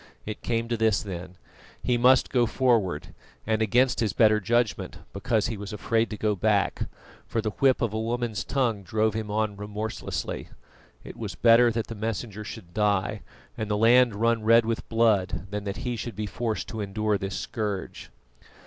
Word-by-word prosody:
It 105 0 -6
came 115 -1 -1
to 120 - 0
this, 110 -2 +2
then: 90 -2 -7 0.5
he 125 - +2
must 125 +2 +4
go 120 -2 +3
forward, 110 - +1 0.3
and 110 0 0
against 125 +4 +3
his 110 -4 0
better 110 -2 +4
judgment, 120 +1 0 0.2
because 110 +1 0
he 115 -2 -3
was 100 0 -7
afraid 110 +2 0
to 105 - -5
go 105 -1 0
back, 100 +1 +1 0.4
for 115 - -1
the 110 -1 -1
whip 130 +3 +2
of 115 -3 -1
a 110 - -1
woman's 115 -1 -2
tongue 120 -7 0
drove 110 +3 0
him 110 -1 -4
on 105 -1 -1
remorselessly. 105 +1 -4 0.5
It - - -10
was - - -5
better 120 +1 +6
that 115 -1 -1
the - - -7
Messenger 110 -1 -4
should 85 -4 -9
die, 105 0 +1 0.3
and 110 -1 -4
the 105 - +1
land 120 +1 +5
run 115 +1 +1
red 115 +1 +5
with 115 0 -3
blood, 110 -6 +2
than 105 0 -4
that 100 -1 -3
he 125 -1 -1
should 120 0 -5
be 105 - -3
forced 110 +2 -3
to 110 - -4
endure 105 +1 -1
this 95 0 -4
scourge. 105 -4 -4
110 Hz, 185 wpm, -26 LUFS, 105-115 Hz, 0.5 s, better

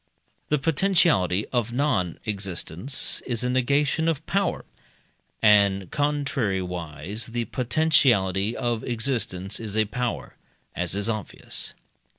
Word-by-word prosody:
The 150 - +3
potentiality 150 - +2
of 120 -2 0
non 120 - 0
existence 100 - -1
is 120 -1 0
a 125 - +1
negation 140 +5 +1
of 160 -1 -1
power, 195 -1 0 0.8
and 100 -3 +4
contrariwise 100 - -2
the 120 -1 -1
potentiality 120 - +2
of 120 -3 -1
existence 115 -6 -2
is 110 -2 -4
a 110 - +3
power, 120 +3 -4 0.4
as 90 +1 -1
is 100 +1 0
obvious. 110 -3 -4
115 Hz, 110 wpm, -25 LUFS, 95-140 Hz, 0.8 s, and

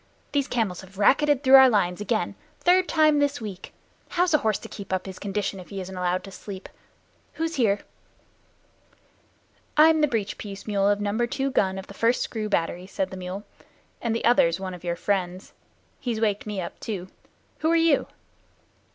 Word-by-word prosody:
"Those 280 -2 +1
camels 215 -7 -1
have 190 0 -15
racketed 285 +6 +3
through 265 -1 +4
our 265 -1 +8
lines 195 -4 +1
again 210 - -1 0.2
the - - -28
third 360 +1 +4
time 310 -2 +4
this 285 0 +1
week. 200 -5 -7 0.4
How's 355 -1 +1
a 305 - +5
horse 215 -4 +1
to - - -10
keep 200 -3 -9
his 190 -1 -8
condition 200 -1 -3
if 180 - -11
he 195 - -5
isn't 190 0 -6
allowed 180 0 -1
to 195 - -10
sleep. 190 0 -9 0.6
Who's 325 +1 -2
here?" 205 -5 +2 2.0
"I'm 315 +1 +6
the 300 - +4
breech 220 -6 -2
piece 200 -2 -8
mule 200 -2 +2
of 205 0 +2
number 210 +4 0
two 270 +3 -2
gun 190 -5 +1
of 190 - -6
the - - -12
First 230 +4 +2
Screw 215 -2 -4
Battery," 180 -1 -1
said 190 -1 -3
the 190 - -7
mule, 185 +2 -6 0.6
"and 230 -1 -1
the 230 - -2
other's 170 -8 +4
one 190 -1 -5
of 180 - -10
your 170 -1 -1
friends. 185 0 -2 0.5
He's 240 -5 -2
waked 210 -2 0
me 210 -2 -3
up 175 - -6
too. 190 -4 -5 0.5
Who 315 - +1
are 335 - +4
you?" 330 -4 +3
205 Hz, 190 wpm, -25 LUFS, 190-265 Hz, 2.0 s, our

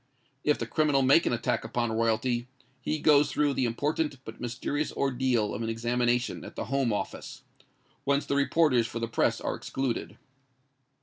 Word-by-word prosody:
If 150 - +3
the 115 - -3
criminal 140 +2 +2
make 140 +6 +5
an - - +1
attack 120 +1 -1
upon 120 -2 -1
royalty, 115 +2 0 0.3
he 155 - -1
goes 145 -1 +4
through 145 -1 +1
the 130 - 0
important 145 +5 -1
but 110 - -9
mysterious 125 +5 -2
ordeal 125 -5 0
of 110 - -4
an 115 - -2
examination 120 +1 0
at - - -10
the - - -4
Home 135 -4 +2
Office, 105 - -5 0.6
whence 140 +1 +1
the 140 - -1
reporters 140 -4 +3
for 115 - -6
the 115 0 -2
press 115 - +1
are - - -2
excluded. 135 -3 -3
125 Hz, 170 wpm, -28 LUFS, 115-140 Hz, 0.6 s, make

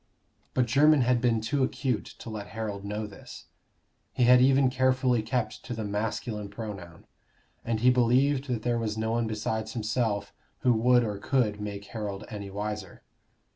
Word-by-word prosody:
But 125 - +3
Jermyn 145 +4 +5
had 125 -1 +2
been 115 -3 +2
too 135 +5 0
acute 130 -2 -1
to 115 - -8
let 105 -2 -6
Harold 105 -3 -4
know 105 +2 -3
this: 105 - -11 0.7
he 125 - +1
had 125 +1 +7
even 135 0 +4
carefully 130 -2 +2
kept 115 +3 -2
to 125 - -4
the 110 - -4
masculine 105 0 -3
pronoun. 100 -8 -8 0.6
And 115 -1 -1
he 125 +1 +6
believed 130 +3 +3
that 120 -4 -2
there 120 -1 +1
was 110 -1 -2
no 110 0 -1
one 115 0 0
besides 110 0 -3
himself 110 -2 -1 0.3
who 125 - +4
would 120 +2 +4
or 105 -3 -3
could 105 -3 0
make 100 -1 -5
Harold 105 -3 -5
any 100 -2 -6
wiser. 105 -1 -5
115 Hz, 170 wpm, -28 LUFS, 105-125 Hz, 0.7 s, had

